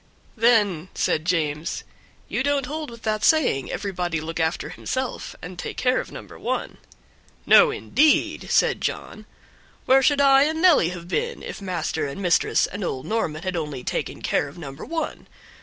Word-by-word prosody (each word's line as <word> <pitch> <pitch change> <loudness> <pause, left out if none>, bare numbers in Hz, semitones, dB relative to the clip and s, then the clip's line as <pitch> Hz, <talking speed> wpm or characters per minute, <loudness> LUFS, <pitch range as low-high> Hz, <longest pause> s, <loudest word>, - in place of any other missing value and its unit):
"Then," 210 -7 +3
said 155 - 0
James, 155 -3 -1 0.4
"you - - -1
don't 280 -1 +1
hold 305 +2 -5
with 235 -1 -12
that 215 -1 -1
saying, 270 - +3
'Everybody 175 -4 -2
look 165 +2 -5
after 160 +1 -1
himself, 260 -1 -4
and 180 +1 -8
take - - -5
care 255 0 +2
of - - -6
number - - -10
one'?" - - -3 0.7
"No, - - +7
indeed," 305 0 +2
said - - +2
John, - - -4 0.6
"where 265 +1 +5
should 285 +2 +3
I 275 0 +6
and 315 +1 -1
Nelly 325 - +5
have 175 -1 -8
been 475 - -2
if - - -7
master 170 -5 -2
and 140 - -7
mistress 180 -3 +2
and 200 +1 -6
old 130 -6 -3
Norman 165 -8 -2
had 185 -1 -2
only 150 -6 -4
taken - - -4
care - - +1
of 140 - -12
number 140 -3 -8
one? 330 -1 -4
185 Hz, 170 wpm, -24 LUFS, 160-270 Hz, 0.7 s, No